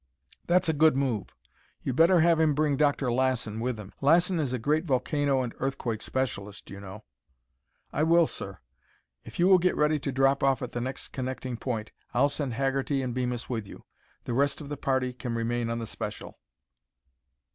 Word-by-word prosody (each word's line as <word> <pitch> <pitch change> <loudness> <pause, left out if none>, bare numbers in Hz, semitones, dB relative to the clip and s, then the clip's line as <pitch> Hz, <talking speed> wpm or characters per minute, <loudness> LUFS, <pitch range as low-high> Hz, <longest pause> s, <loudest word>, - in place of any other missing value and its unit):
"That's 180 +1 +3
a 160 - +2
good 155 -1 +4
move. 125 -7 0 0.6
You'd 130 - -2
better 170 +3 +5
have 165 -1 +4
him 155 -3 +3
bring 150 -1 +2
Dr. 145 -3 +2
Lassen 120 -4 0
with 120 -1 -2
him. 100 -2 -10
Lassen 170 +5 +4
is 140 -5 -1
a 130 - 0
great 150 +7 +1
volcano 140 -2 +1
and 120 - -5
earthquake 130 -5 -2
specialist, 105 -6 -4
you 100 - -8
know." 100 +2 -9 0.9
"I - - 0
will, 165 +2 +5
sir. 95 -9 -6 0.7
If - - -11
you 175 - +4
will 190 -1 +7
get 180 +1 +2
ready 150 0 +2
to 140 - -3
drop 135 +1 +3
off 135 -1 +2
at 125 - -5
the 120 - -3
next 130 +2 -5
connecting 130 -1 -4
point, 115 -2 -4 0.2
I'll 140 +4 +4
send 140 -4 -3
Haggerty 135 +1 0
and 125 -2 -3
Bemis 125 -1 -2
with 110 -5 -3
you. - - -12 0.4
The 120 - -3
rest 140 +3 +1
of 145 -2 -8
the 145 - -3
party 130 -2 0
can 125 -1 -4
remain 115 0 -1
on 115 - -1
the 115 - -4
special." - - -7
130 Hz, 190 wpm, -28 LUFS, 120-150 Hz, 0.9 s, will